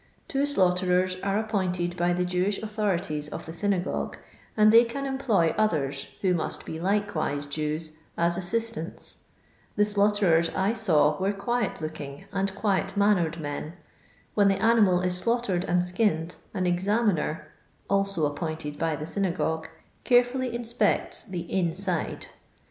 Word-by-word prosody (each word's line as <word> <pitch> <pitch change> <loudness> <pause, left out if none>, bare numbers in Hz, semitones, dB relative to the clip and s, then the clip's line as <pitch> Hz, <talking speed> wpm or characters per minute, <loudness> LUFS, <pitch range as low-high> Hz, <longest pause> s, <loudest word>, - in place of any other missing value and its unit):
Two 275 +1 0
slaughterers 185 -5 +2
are 195 0 0
appointed 185 -5 -1
by 175 0 +1
the 180 0 0
Jewish 180 +3 0
autho 215 -1 -1
rities 150 -3 -4
of - - -6
the 160 - -7
synagogue, 190 0 -1 0.4
and 215 0 +6
they 230 +1 +9
can 275 +4 -4
employ 240 -11 +1
others, 145 -10 0
who 185 -2 +2
must 170 - -3
be 160 - -5
likewise 180 -7 -1
Jews, 155 +2 -3 0.3
as 170 0 +2
assistants. 215 -1 -3 0.6
The 210 - +4
slaughterers 200 -5 +3
I 195 +4 +1
saw 155 -10 +2
were 190 +1 +1
quiet 215 +1 -2
looking 150 -3 -6
and 195 0 -1
quiet 195 -1 0
mannered 180 -5 +2
men. 150 +1 -5 0.6
When 205 -2 +4
the 195 -1 +2
animal 215 -5 +4
is 180 0 0
slaughtered 200 -3 0
and 175 0 +1
skinned, 180 -3 0
an 185 -3 -2
examiner 180 -3 0 0.4
(also 195 -5 +1
ap 145 0 -6
pointed 155 -3 -4
by 165 -2 0
the 150 - -5
synagogue) 165 -3 -1 0.3
carefully 245 0 +2
inspects 235 0 0
the 185 -5 -4
'inside.' 175 0 -1
185 Hz, 145 wpm, -27 LUFS, 165-210 Hz, 0.6 s, they